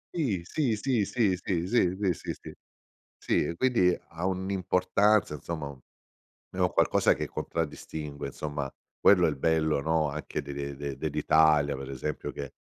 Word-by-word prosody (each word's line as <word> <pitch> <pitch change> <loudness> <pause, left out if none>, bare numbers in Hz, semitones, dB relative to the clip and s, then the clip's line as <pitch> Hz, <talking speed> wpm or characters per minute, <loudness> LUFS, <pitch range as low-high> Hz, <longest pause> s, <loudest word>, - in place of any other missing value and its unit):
Sì, 125 - 0
sì, 130 - 0
sì, 120 -1 +1
sì, 105 -4 +1
sì, 90 -2 -1
sì, 95 -4 +2
sì, 95 -3 +2
sì, - - -5
sì, - - -11 0.6
sì. 85 - 0
Quindi 115 -9 +3
ha 85 +1 -6
un'importanza, 95 0 +2
insomma, 80 +1 -5
u 70 -2 -11 0.7
è - - -9
un - - +3
qualcosa - - +3
che - - -3
contraddistingue, 75 -2 -4
insomma, 75 -2 -4 0.3
quello 90 -3 +6
è - - +2
il 75 - -5
bello, 80 0 +2
no, 80 0 +1
anche 75 +2 -4
de 70 - -7
de 70 0 -5
de 70 -1 -5
dell'Italia, 75 -1 +3
per 65 0 -6
esempio 70 +3 -4
che 70 -1 -7
80 Hz, 160 wpm, -28 LUFS, 75-95 Hz, 0.7 s, quello